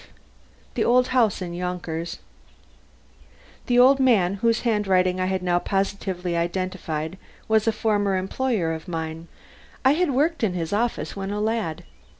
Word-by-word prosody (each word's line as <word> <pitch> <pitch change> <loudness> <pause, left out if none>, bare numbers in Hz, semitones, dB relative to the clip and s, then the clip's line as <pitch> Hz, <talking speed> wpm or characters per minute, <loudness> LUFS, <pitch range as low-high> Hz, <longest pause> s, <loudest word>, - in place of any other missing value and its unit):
V - - -20 0.7
THE - - +4
OLD 250 +1 +3
HOUSE 230 -7 +2
IN 175 -1 -6
YONKERS 175 -2 -4 1.5
The 245 - +2
old 265 +3 +6
man 215 -9 +3
whose 230 -1 +2
handwriting 190 -5 +2
I 185 - 0
had 190 -1 -1
now 175 -1 +2
positively 195 -2 -2
identified 175 -1 -3 0.3
was 220 0 +2
a - - +5
former 205 -3 +1
employer 190 -3 -1
of 160 +3 -7
mine. 165 -1 -5 0.6
I 265 - +7
had 340 +3 +2
worked 295 +3 +1
in 200 -5 +2
his 165 +1 -3
office 230 +3 -1
when 195 -1 -4
a 205 +1 -2
lad. 215 -7 -1
195 Hz, 150 wpm, -24 LUFS, 175-230 Hz, 1.5 s, I